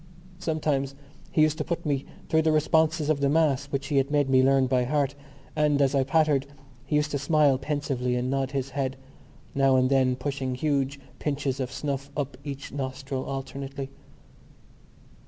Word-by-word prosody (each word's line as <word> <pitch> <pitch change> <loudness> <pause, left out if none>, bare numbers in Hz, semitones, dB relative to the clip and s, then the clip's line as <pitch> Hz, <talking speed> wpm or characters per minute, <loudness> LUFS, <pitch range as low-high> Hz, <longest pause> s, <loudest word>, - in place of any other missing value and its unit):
Sometimes 150 -5 -1 0.4
he 155 - +4
used 155 0 +2
to - - +1
put 170 - -3
me 140 -2 0 0.2
through 160 - +3
the 160 0 +2
responses 155 0 +2
of 155 -2 +2
the 140 0 +2
Mass 145 -3 +2
which 140 0 -3
he 145 - +1
had 135 0 +2
made 145 -2 +2
me 130 -1 +6
learn 135 0 +4
by 130 -1 +2
heart; 140 +1 0 0.4
and, 150 -2 +2
as 140 0 +3
I 135 -1 +3
pattered, 140 -1 +2 0.4
he 150 - 0
used 150 0 +1
to 140 - -1
smile 145 -2 +3
pensively 135 -3 -1
and 125 +1 -1
nod 135 0 0
his 135 -1 -3
head, 135 -1 -2 0.6
now 135 -1 +4
and 130 +1 +3
then 130 -2 +3
pushing 130 -1 -3
huge 140 0 0 0.2
pinches 140 -2 -1
of 125 -1 -2
snuff 140 0 -3
up 140 -3 -2
each 140 -1 -6
nostril 135 -1 -4
alternately. 135 0 -5
140 Hz, 175 wpm, -27 LUFS, 135-150 Hz, 0.6 s, me